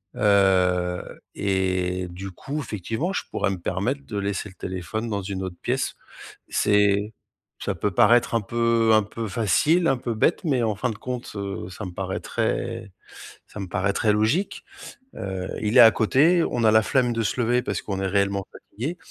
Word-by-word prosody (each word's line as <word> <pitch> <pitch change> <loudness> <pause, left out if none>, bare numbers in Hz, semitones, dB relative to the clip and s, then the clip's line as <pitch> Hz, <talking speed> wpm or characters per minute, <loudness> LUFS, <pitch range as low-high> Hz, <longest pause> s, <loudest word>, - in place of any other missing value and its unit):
Heu, 90 -3 +2 0.2
et 95 -2 0
du 95 +3 -7
coup 140 - -5
effectivement, 115 - -3
je - - -2
pourrais - - 0
me 95 - -4
permettre 100 +11 -2
de 105 - -5
laisser 100 0 -2
le 95 - -17
téléphone 95 +6 -4
dans 100 -2 -2
une 95 -1 -4
autre 90 -2 -6
pièce. - - -1 0.6
C'est 105 +1 +2 0.5
ça - - -2
peut 105 - -1
paraître 120 +6 +4
un 115 - +2
peu 115 +1 +2
un 110 - +6
peu 110 +2 -5
facile, 125 - +2
un 135 - +2
peu 120 -1 -3
bête, 160 - +1
mais 135 -6 +1
en 110 -2 0
fin 125 +5 -1
de - - -7
compte, 125 +2 -5
heu, 100 -2 -5
ça 100 +3 -7
me 90 - -6
paraîtrait 110 +4 -3 0.6
ça - - -10
me 95 - -4
paraîtrait 100 +3 +1
logique. 110 - 0 0.5
Heu, 95 -1 -4
il 110 +4 +1
est - - +11
à 115 -1 +9
côté, 160 +10 +3
on 120 - -1
a 110 - +5
la 110 0 +6
flemme 125 -3 +1
de 115 - -1
se 110 - -2
lever 120 +1 +2
parce - - -2
qu'on 100 -2 -3
est 95 - 0
réellement 100 0 0
fatigué 145 +11 -6
105 Hz, 185 wpm, -24 LUFS, 95-120 Hz, 0.6 s, est